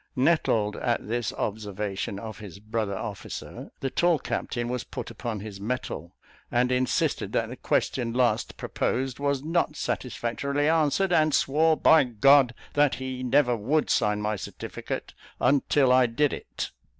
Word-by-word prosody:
Nettled 125 Hz, -7 st, +2 dB
at 120 Hz, -4 st, -1 dB
this 120 Hz, +1 st, -1 dB
observation 100 Hz, -2 st, -3 dB
of 110 Hz, +2 st, -7 dB
his 100 Hz, -4 st, -9 dB
brother 105 Hz, -1 st, -3 dB
officer, 105 Hz, -2 st, -7 dB
the 135 Hz, -, -2 dB
tall 175 Hz, +4 st, +3 dB
captain 120 Hz, -3 st, -3 dB
was 125 Hz, 0 st, -2 dB
put -, -, -7 dB
upon 115 Hz, -5 st, -5 dB
his 100 Hz, -2 st, -8 dB
metal, 105 Hz, -7 st, -4 dB, 0.3 s
and 125 Hz, +1 st, +2 dB
insisted 125 Hz, 0 st, 0 dB
that -, -, 0 dB
the -, -, -6 dB
question 120 Hz, -3 st, 0 dB
last 120 Hz, -2 st, +1 dB
proposed 130 Hz, 0 st, -2 dB
was 140 Hz, -1 st, 0 dB
not 165 Hz, -1 st, 0 dB
satisfactorily 140 Hz, +3 st, -2 dB
answered, 165 Hz, +4 st, +2 dB
and 155 Hz, -2 st, +4 dB
swore 155 Hz, +3 st, +3 dB
by 160 Hz, -2 st, +6 dB
G 120 Hz, -3 st, -12 dB, 0.6 s
that 145 Hz, -1 st, +3 dB
he 130 Hz, 0 st, -5 dB
never 125 Hz, -1 st, +3 dB
would 135 Hz, +8 st, 0 dB
sign 105 Hz, -2 st, +2 dB
my 105 Hz, 0 st, -1 dB
certificate 90 Hz, -, -6 dB, 0.3 s
until 140 Hz, -1 st, +3 dB
I 130 Hz, -1 st, +5 dB
did 140 Hz, +5 st, +1 dB
it. -, -, -5 dB
125 Hz, 150 wpm, -26 LUFS, 110-145 Hz, 0.6 s, by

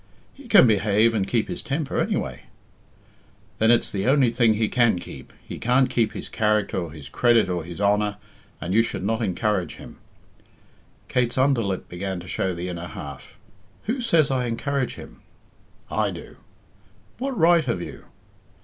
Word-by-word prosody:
"He 275 Hz, -2 st, -14 dB
can 205 Hz, -, +7 dB
behave 110 Hz, +1 st, +3 dB
and 100 Hz, -3 st, 0 dB
keep 110 Hz, +2 st, 0 dB
his 175 Hz, -, -4 dB
temper, 145 Hz, 0 st, -2 dB
anyway." -, -, -2 dB, 1.1 s
"Then 110 Hz, -, +4 dB
it's 120 Hz, 0 st, +3 dB
the 100 Hz, +2 st, -2 dB
only 130 Hz, -3 st, +4 dB
thing 115 Hz, -2 st, +3 dB
he 110 Hz, 0 st, +1 dB
can 120 Hz, -4 st, +3 dB
keep. 85 Hz, -, -10 dB, 0.2 s
He -, -, -7 dB
can't 125 Hz, +2 st, +2 dB
keep 115 Hz, -3 st, +1 dB
his -, -, -6 dB
character 105 Hz, -2 st, 0 dB
or 85 Hz, -4 st, -3 dB
his 75 Hz, -3 st, -10 dB
credit 120 Hz, -, +3 dB
or 90 Hz, -2 st, -2 dB
his 85 Hz, +2 st, -9 dB
honor, 105 Hz, 0 st, +1 dB, 0.4 s
and 85 Hz, +4 st, -3 dB
you 115 Hz, -, +5 dB
should 115 Hz, -5 st, -3 dB
not 110 Hz, +3 st, 0 dB
encourage 100 Hz, -2 st, -1 dB
him." -, -, -12 dB, 1.1 s
Kate's 125 Hz, -1 st, 0 dB
under 130 Hz, -2 st, +3 dB
lip 95 Hz, -3 st, -3 dB
began 95 Hz, +1 st, -4 dB
to 90 Hz, -, -11 dB
show 95 Hz, 0 st, -1 dB
the 85 Hz, +1 st, -4 dB
inner 90 Hz, -1 st, -5 dB
half. 70 Hz, +4 st, -9 dB, 0.5 s
"Who 245 Hz, +5 st, -2 dB
says 165 Hz, -, +3 dB
I 130 Hz, -2 st, 0 dB
encourage 130 Hz, +3 st, -2 dB
him?" -, -, -12 dB, 0.7 s
"I -, -, +1 dB
do." -, -, -9 dB, 0.8 s
"What 265 Hz, -1 st, -3 dB
right 170 Hz, -1 st, +4 dB
have 115 Hz, -8 st, -1 dB
you?" -, -, -8 dB
110 Hz, 170 wpm, -24 LUFS, 95-130 Hz, 1.1 s, can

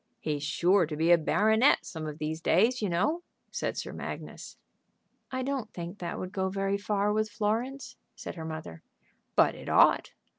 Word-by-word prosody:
"He's 150 Hz, -2 st, -2 dB
sure 175 Hz, +4 st, +3 dB
to 155 Hz, -, -4 dB
be 165 Hz, +2 st, +3 dB
a 175 Hz, -, +8 dB
baronet 220 Hz, -, +3 dB
some 160 Hz, -3 st, -6 dB
of 150 Hz, -1 st, -6 dB
these 155 Hz, +1 st, -3 dB
days, 225 Hz, +11 st, +3 dB
you 205 Hz, -, 0 dB
know," 210 Hz, -, +1 dB, 0.3 s
said -, -, -3 dB
Sir -, -, -4 dB
Magnus. -, -, -7 dB, 0.7 s
"I 260 Hz, 0 st, -2 dB
don't 265 Hz, -5 st, -3 dB
think 175 Hz, +3 st, -6 dB
that 170 Hz, -1 st, -4 dB
would 185 Hz, -, -5 dB
go 190 Hz, -1 st, -1 dB
very 195 Hz, +1 st, -1 dB
far 205 Hz, 0 st, 0 dB
with 215 Hz, 0 st, 0 dB
Florence," 230 Hz, +7 st, -2 dB, 0.2 s
said -, -, -7 dB
her 165 Hz, -, -7 dB
mother. 155 Hz, -, -7 dB, 0.5 s
"But -, -, +5 dB
it -, -, -9 dB
ought. -, -, +4 dB
195 Hz, 180 wpm, -29 LUFS, 165-215 Hz, 0.7 s, a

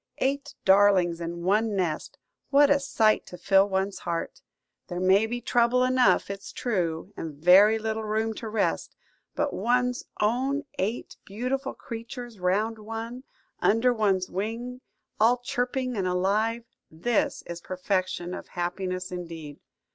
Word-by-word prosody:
"Eight 275 Hz, +1 st, -1 dB
darlings 190 Hz, -3 st, +4 dB
in 170 Hz, +1 st, -5 dB
one 210 Hz, +3 st, +2 dB
nest! 175 Hz, -5 st, -2 dB, 0.3 s
What 285 Hz, 0 st, +5 dB
a 285 Hz, -, +5 dB
sight 220 Hz, -6 st, +2 dB
to 180 Hz, -, -9 dB
fill 195 Hz, +2 st, +4 dB
one's 190 Hz, +1 st, -1 dB
heart! 170 Hz, -1 st, -4 dB, 0.5 s
There 175 Hz, -1 st, -4 dB
may 190 Hz, +4 st, +4 dB
be 240 Hz, +1 st, -4 dB
trouble 240 Hz, +1 st, +3 dB
enough, 255 Hz, -5 st, +3 dB
it's 195 Hz, 0 st, -8 dB
true, 180 Hz, -5 st, -2 dB
and 160 Hz, -3 st, -6 dB
very 190 Hz, +8 st, +6 dB
little 220 Hz, 0 st, -3 dB
room 220 Hz, +1 st, -1 dB
to 225 Hz, -, -5 dB
rest; 215 Hz, -1 st, -1 dB, 0.4 s
but 295 Hz, 0 st, 0 dB
one's 245 Hz, +4 st, +1 dB, 0.2 s
own 260 Hz, +7 st, +1 dB, 0.2 s
eight 215 Hz, +6 st, -3 dB
beautiful 255 Hz, +6 st, -3 dB
creatures 230 Hz, -1 st, -8 dB
round 210 Hz, +5 st, 0 dB
one, 225 Hz, +4 st, -6 dB, 0.3 s
under 230 Hz, +4 st, +3 dB
one's 195 Hz, -5 st, +1 dB
wing, 230 Hz, +6 st, -4 dB, 0.4 s
all 230 Hz, +3 st, +5 dB
chirping 250 Hz, +1 st, -2 dB
and 190 Hz, -3 st, -1 dB
alive–this 210 Hz, +1 st, -1 dB
is 170 Hz, 0 st, -7 dB
perfection 185 Hz, -1 st, -2 dB
of -, -, -7 dB
happiness 185 Hz, +1 st, -3 dB
indeed!" 165 Hz, -5 st, -7 dB
215 Hz, 135 wpm, -27 LUFS, 185-240 Hz, 0.5 s, very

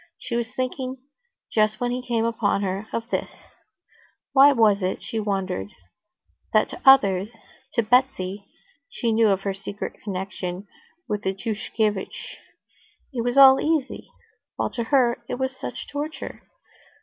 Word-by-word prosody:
She 235 Hz, -, -5 dB
was 235 Hz, 0 st, -2 dB
thinking, 255 Hz, 0 st, -3 dB, 0.6 s
just 215 Hz, -1 st, +2 dB
when 245 Hz, 0 st, 0 dB
he 250 Hz, +1 st, -2 dB
came 235 Hz, -2 st, 0 dB
upon 210 Hz, -3 st, 0 dB
her, 195 Hz, +2 st, -3 dB
of 230 Hz, 0 st, -3 dB
this: -, -, -4 dB, 0.9 s
why 275 Hz, +1 st, +8 dB
was 215 Hz, -6 st, +4 dB
it, 185 Hz, -1 st, -2 dB
she 210 Hz, +3 st, -3 dB
wondered, 195 Hz, -, -2 dB, 0.9 s
that -, -, +4 dB
to -, -, -9 dB
others, 210 Hz, -6 st, +5 dB, 0.4 s
to 235 Hz, -, +2 dB
Betsy 210 Hz, -5 st, +1 dB, 0.4 s
(she 235 Hz, -2 st, -1 dB
knew 225 Hz, 0 st, +4 dB
of 195 Hz, -2 st, +2 dB
her 195 Hz, 0 st, -2 dB
secret 200 Hz, +1 st, -7 dB
connection 190 Hz, -1 st, -5 dB, 0.4 s
with 210 Hz, -3 st, -2 dB
Tushkevitch) 210 Hz, +1 st, -3 dB, 0.8 s
it 240 Hz, -3 st, -2 dB
was 245 Hz, +2 st, -1 dB
all 270 Hz, -1 st, +9 dB
easy, 305 Hz, -3 st, -1 dB, 0.5 s
while -, -, -2 dB
to 235 Hz, -2 st, -3 dB
her 240 Hz, -2 st, +2 dB
it -, -, -1 dB
was 260 Hz, +1 st, -2 dB
such -, -, -7 dB
torture? 295 Hz, +2 st, -6 dB
225 Hz, 140 wpm, -24 LUFS, 200-255 Hz, 0.9 s, all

